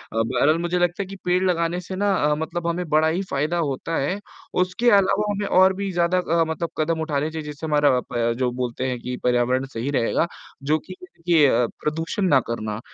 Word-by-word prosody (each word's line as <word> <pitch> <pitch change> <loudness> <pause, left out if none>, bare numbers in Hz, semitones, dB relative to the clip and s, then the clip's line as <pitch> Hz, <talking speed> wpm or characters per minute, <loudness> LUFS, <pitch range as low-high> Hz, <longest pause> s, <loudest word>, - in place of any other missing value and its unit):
बहरहाल 125 +7 +2
मुझे 175 +1 -1
लगता 175 +2 +1
है - - -9
कि 195 - -8
पेड़ 180 +1 +2
लगाने 175 -1 +1
से 185 +1 -7
ना 200 +1 +1
अ, 150 -2 +2
मतलब 165 +2 -3
हमें 170 +1 -2
बड़ा 155 +1 +3
ही 170 +4 0
फ़ायदा 150 +5 0
होता 160 +1 -2
है, 185 +9 -1 0.4
उसके 185 +7 +1
अलावा 200 +1 +3
हमें 205 0 -2
और 190 0 +5
भी 195 0 -3
ज़्यादा 175 +1 +1 0.2
अ, - - +5
मतलब 165 +1 -3
कदम 160 +1 0
उठाने 150 -1 -1
चाहिए 160 -1 -5
जिससे 150 +1 -6
हमारा 150 -2 +3
अ, - - 0
ब 115 -1 +1
जो 125 -1 +1
बोलते 125 +1 -3
हैं 125 -1 -3
कि 125 +1 -5
पर्यावरण 125 +1 +2
सही 115 +4 -3
रहेगा 140 +5 +1 0.4
जो 155 +3 +2
कि 185 - -8
देखिए 170 -5 +2 0.3
प्रदूषण 165 +7 -1
ना 140 -6 +5
करना, 110 -2 -3
160 Hz, 210 wpm, -23 LUFS, 140-180 Hz, 0.4 s, और